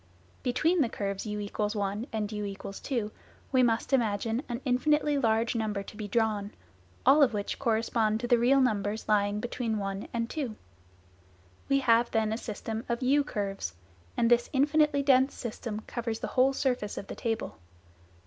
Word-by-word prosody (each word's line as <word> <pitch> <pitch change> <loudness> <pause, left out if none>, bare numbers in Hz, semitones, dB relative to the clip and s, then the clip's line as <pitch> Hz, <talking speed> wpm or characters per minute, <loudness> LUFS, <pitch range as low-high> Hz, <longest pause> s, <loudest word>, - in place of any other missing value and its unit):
Between 315 +8 +2
the 245 - +2
curves 200 0 -3
u= 210 0 -3 0.2
1 210 +1 -1
and 215 -1 -2
u= 205 -2 -4
2 210 +3 -4 0.4
we 260 -2 +4
must 235 +2 +1
imagine 225 -1 +1
an 240 0 -3
infinitely 295 +3 +2
large 225 -2 +2
number 215 -3 -2
to 195 - -11
be 210 -1 -5
drawn, 210 -2 0 0.6
all 285 +3 +6
of 250 -6 +4
which 205 0 -3
correspond 225 -2 +1
to 240 0 +3
real 245 +4 +4
numbers 215 -4 0
lying 205 -1 +2
between 230 -1 -2
1 195 -1 -4
and 230 -1 -1
2. 310 - -4
fig. 270 - -1
04 215 - -10 1.1
We 275 0 +4
have 235 -1 +4
then 220 -1 +1
a - - -2
system 220 0 -5
of 235 +2 -1
u 285 +3 +4
curves, 195 - -4 0.4
and 230 0 +2
this 240 0 +4
"infinitely 290 +1 +3
dense" 265 -1 +4
system 220 -2 -5
covers 230 -1 -4
the - - -5
whole 265 +1 +4
surface 250 -6 -1
of - - -5
the - - -7
table. 225 - -3
230 Hz, 170 wpm, -29 LUFS, 210-255 Hz, 1.1 s, all